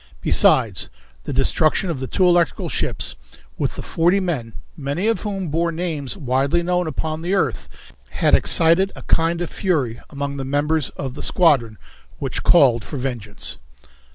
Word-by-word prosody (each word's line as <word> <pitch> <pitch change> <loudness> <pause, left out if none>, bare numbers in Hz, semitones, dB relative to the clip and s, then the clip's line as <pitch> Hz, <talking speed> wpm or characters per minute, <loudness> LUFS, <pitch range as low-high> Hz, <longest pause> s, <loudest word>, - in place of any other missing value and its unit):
Besides, - - +3 0.4
the - - -4
destruction 155 +6 +2
of 150 - -4
the 130 - -4
two 185 - +1
electrical 175 -5 +2
ships - - -2 0.4
with - - -1
the - - -7
forty 175 +4 +2
men, 145 - -3 0.2
many 145 +4 -3
of 225 0 +1
whom 195 -5 -3
bore 170 +3 0
names 160 -5 -3
widely 140 +5 0
known 180 0 0
upon 155 +2 -3
the 180 +4 0
earth, - - -1 0.4
had - - +1
excited 170 +3 +4
a - - -10
kind 165 +1 +1
of 175 - -6
fury 140 - -1
among 140 0 -4
the 135 - -3
members 145 +2 0
of 135 -3 -4
the 145 - -7
squadron 135 - +2 0.4
which - - -3
called 125 -9 +4
for 145 - -6
vengeance. 120 -6 -5
155 Hz, 160 wpm, -21 LUFS, 135-175 Hz, 0.4 s, excited